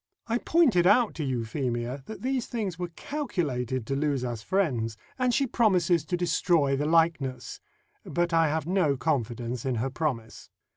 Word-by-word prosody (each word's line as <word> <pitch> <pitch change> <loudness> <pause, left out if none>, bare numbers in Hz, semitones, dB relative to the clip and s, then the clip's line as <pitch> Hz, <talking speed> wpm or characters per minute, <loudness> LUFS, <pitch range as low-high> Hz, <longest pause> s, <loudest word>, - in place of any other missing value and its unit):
I 235 +1 0
pointed 250 - +3
out 220 +3 +4
to 160 - -4
Euphemia 125 0 -2
that 220 - -8
these 260 -2 -1
things 205 -8 -3
were 175 - -2
calculated 135 - -2
to 135 - -2
lose 140 -3 0
us 120 -3 -4
friends, 120 - 0 0.2
and 250 -1 +2
she 275 +3 +2
promises 180 - +2
to 180 +2 -1
destroy 165 -4 +2
the 145 +2 -1
likeness; 155 -6 +1 0.4
but 175 0 -1
I 165 -1 +4
have 155 0 -1
no 170 -6 +1
confidence 120 -4 -2
in 130 -2 -1
her 125 +4 -2
promise. 125 -7 -4
155 Hz, 160 wpm, -27 LUFS, 125-185 Hz, 0.4 s, out